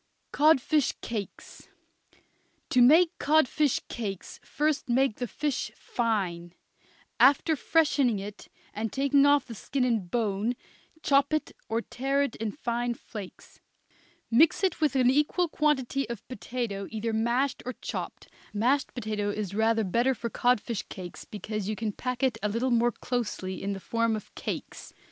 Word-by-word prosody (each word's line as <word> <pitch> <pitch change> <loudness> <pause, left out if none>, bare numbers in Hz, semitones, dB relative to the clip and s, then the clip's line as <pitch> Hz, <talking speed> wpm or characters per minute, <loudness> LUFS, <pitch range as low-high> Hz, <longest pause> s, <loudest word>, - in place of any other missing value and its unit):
CODFISH 300 -1 +3
CAKES. 215 -4 -7 1.0
To 255 - +5
make 320 +7 +7
codfish 300 -2 +2
cakes, 200 -6 -6
first 295 -2 -1
make 255 -1 +2
the 245 - -3
fish 290 +3 -2
fine; 185 -8 -2 0.7
after 300 +3 +5
freshening 285 -6 +2
it 200 +1 -8 0.3
and 215 0 -3
taking 280 +1 +3
off 285 -1 +4
the 235 - -8
skin 255 +5 -2
and 225 -8 0
bone, 220 +1 0 0.5
chop 275 0 +3
it 310 - 0 0.2
or 225 +1 0
tear 275 +3 0
it 280 - -3
in 220 -1 -2
fine 240 -2 -2
flakes; 205 -5 -10 0.7
mix 305 +11 +4
it 375 -3 +1
with 300 -3 +2
an 255 -1 +4
equal 300 +5 +2
quantity 275 -4 0
of 235 -3 -7
potato 230 -4 -4
either 225 +1 -3
mashed 240 +5 0
or 255 - -4
chopped - - -6 0.3
mashed 255 +6 +1
potato 210 -3 -2
is 205 -2 -3
rather 220 +1 +2
better 240 +7 +1
for 235 0 -5
codfish 240 -3 +1
cakes 180 -2 -8
because 210 -1 -5
you 215 - -1
can 220 0 -2
pack 250 +4 -4
it 245 -4 +1
a 210 - 0
little 235 +5 0
more 240 0 +3
closely 210 -8 -3
in 200 +1 -2
the 195 - -6
form 230 +2 0
of 215 - -8
cakes. - - -6
240 Hz, 150 wpm, -28 LUFS, 215-275 Hz, 1.0 s, make